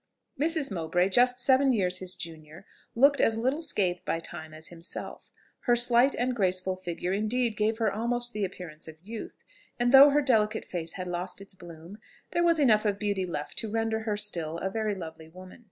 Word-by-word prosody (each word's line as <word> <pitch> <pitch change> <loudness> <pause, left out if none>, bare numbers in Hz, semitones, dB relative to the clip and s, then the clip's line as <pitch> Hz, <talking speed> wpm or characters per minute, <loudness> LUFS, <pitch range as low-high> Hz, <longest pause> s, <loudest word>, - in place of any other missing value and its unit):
Mrs. 310 -3 +1
Mowbray, 175 +1 0
just 245 +5 +3
seven 265 +2 +3
years 185 -6 +1
his 185 -1 -4
junior, 160 +1 -10 0.3
looked 280 +4 +4
as 225 - +2
little 260 +7 0
scathed 185 - 0
by 165 - -2
time 160 -1 -9
as 155 0 -10
himself; 170 0 -8 0.4
her 240 - +5
slight 240 +2 +5
and 250 +1 -1
graceful 185 -2 +1
figure 180 0 -4
indeed 220 +3 0
gave 215 +1 0
her 220 -3 0
almost 240 +2 -2
the 210 - -2
appearance 175 -5 -6
of 160 0 -11
youth; 220 +3 -9 0.4
and 240 0 +2
though 275 +2 +9
her 290 +1 +2
delicate 220 -4 +1
face 165 -2 -5
had 185 -1 -6
lost 180 +1 -4
its 195 0 -9
bloom, 175 +2 -12 0.3
there 345 - +1
was 335 -1 +3
enough 230 -8 +4
of 205 -2 0
beauty 200 -3 -2
left 150 -4 -5
to 225 - -4
render 225 0 -1
her 220 -2 -2
still 170 -6 0
a 190 +3 -3
very 215 -1 -1
lovely 160 -3 -9
woman. 185 +4 -13
205 Hz, 195 wpm, -28 LUFS, 180-240 Hz, 0.4 s, though